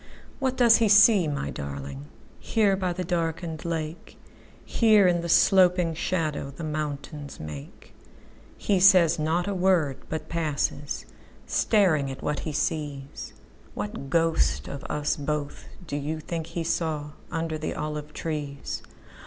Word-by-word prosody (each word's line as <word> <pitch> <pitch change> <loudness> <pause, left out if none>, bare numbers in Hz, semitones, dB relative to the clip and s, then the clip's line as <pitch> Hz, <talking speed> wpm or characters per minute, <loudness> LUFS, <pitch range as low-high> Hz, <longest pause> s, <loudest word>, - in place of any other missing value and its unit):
What 260 -2 -1
does 235 -2 +7
he 225 -3 +2
see, 205 -3 +7
my 140 -2 -3
darlingHere 70 - -3
by 185 -2 -1
the 180 +1 -3
darkened 165 -2 -2
lake? 160 -1 -5 0.5
Here, 215 -4 +4
in 175 -1 +2
the 170 - -5
sloping 180 -2 +4
shadowThe 155 -3 -2
mountains 150 -1 -5
make? 75 -2 -9 0.6
He 200 -3 +1
says 180 -4 +6
not 165 +4 0
a 200 - -1
word, 180 -7 +2
but 155 0 -4
passes, 150 -3 -2 0.4
Staring 170 -10 +2
at 135 - -8
what 150 - -1
he 155 - -4
sees. 145 -2 -3 0.4
What 105 +6 -5
ghost 140 - +1
of 140 - -7
us 150 0 -1
both 145 0 -4 0.2
do 145 - -5
you 150 +2 -3
think 165 +1 -5
he 170 - -4
sawUnder 160 0 -3
the 155 - -3
olive 150 0 -4
trees? 150 -3 -4
155 Hz, 130 wpm, -26 LUFS, 145-180 Hz, 0.6 s, does